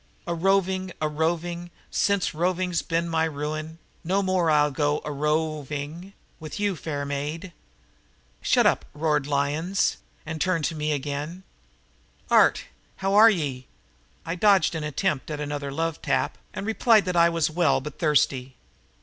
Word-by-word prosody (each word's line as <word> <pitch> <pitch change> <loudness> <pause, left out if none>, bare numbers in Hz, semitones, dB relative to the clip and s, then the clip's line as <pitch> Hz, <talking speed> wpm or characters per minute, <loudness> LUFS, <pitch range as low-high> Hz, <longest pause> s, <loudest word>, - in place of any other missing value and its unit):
"A 170 - -2
roving, 190 +1 +1
a 155 - 0
roving 170 +3 -2 0.2
Since 200 -2 +1
roving's 180 +1 0
been 170 0 -1
my 160 -1 +1
ru 150 -1 -3
i 155 - -2
in, 160 +1 -9 0.3
No 190 +4 +1
more 185 -3 +1
I'll 150 -1 +4
go 145 +1 0
a 150 - -3
ro 155 +2 0
o - - -7
ving 150 +7 -6 0.3
with 155 +4 -7
you, 205 -2 0
fair 145 -2 -4
maid." 150 +6 -4 0.9
"Shut - - +3
up!" - - +3
roared 150 -2 0
Lyons 150 +7 0 0.3
and 160 0 -5
turned 180 -5 +1
again 150 -1 -2
to - - -9
me. 190 - -16 0.9
"Art, - - +5 0.3
how 195 +1 -1
are 215 +3 +8
ye?" 140 - -2 0.6
I 165 - -2
dodged 190 -2 +4
an 160 -2 -3
attempt 150 0 -1
at 150 -1 -4
another 145 -1 -4
love 165 +2 -2
tap - - -1
and 195 - -5
replied 225 -1 +4
that 180 -1 -2
I 170 0 +6
was 165 -2 0
well 170 -2 +2
but 150 +2 -9
thirsty. 135 -4 +1
160 Hz, 165 wpm, -25 LUFS, 150-180 Hz, 0.9 s, are